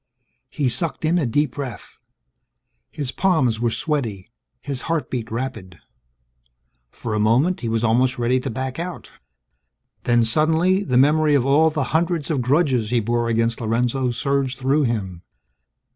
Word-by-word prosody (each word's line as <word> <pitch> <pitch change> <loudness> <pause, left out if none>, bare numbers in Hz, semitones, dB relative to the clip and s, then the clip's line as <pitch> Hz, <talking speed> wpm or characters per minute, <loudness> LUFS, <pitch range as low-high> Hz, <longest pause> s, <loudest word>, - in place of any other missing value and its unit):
He 145 -3 -1
sucked 160 +6 -1
in 170 +3 +2
a 145 - 0
deep 145 +4 +1
breath. 130 -5 -8 0.9
His 145 -5 -4
palms 135 - +1
were 120 0 +1
sweaty; 115 - -3 0.3
his 135 -2 -5
heartbeat 135 -8 -2
rapid. 115 -8 -5 1.1
For 110 - -6
a 105 - 0
moment, 125 +12 +2
he 115 - -3
was 115 0 -1
almost 125 +3 +2
ready 125 +2 +1
to 130 - -4
back 130 +4 -4
out. 175 +1 -6 0.9
Then 120 -1 +3
suddenly, 160 - +2
the 125 -8 0
memory 150 +2 +4
of 130 -3 +2
all 150 +4 +4
the 155 -2 -2
hundreds 165 -2 0
of 140 -5 0
grudges 130 -4 +1
he 120 0 +2
bore 120 +1 -1
against 115 +1 0
Lorenzo 120 +3 0
surged 135 +1 -1
through 135 +3 +1
him. 95 -7 -3
130 Hz, 150 wpm, -21 LUFS, 115-150 Hz, 1.1 s, memory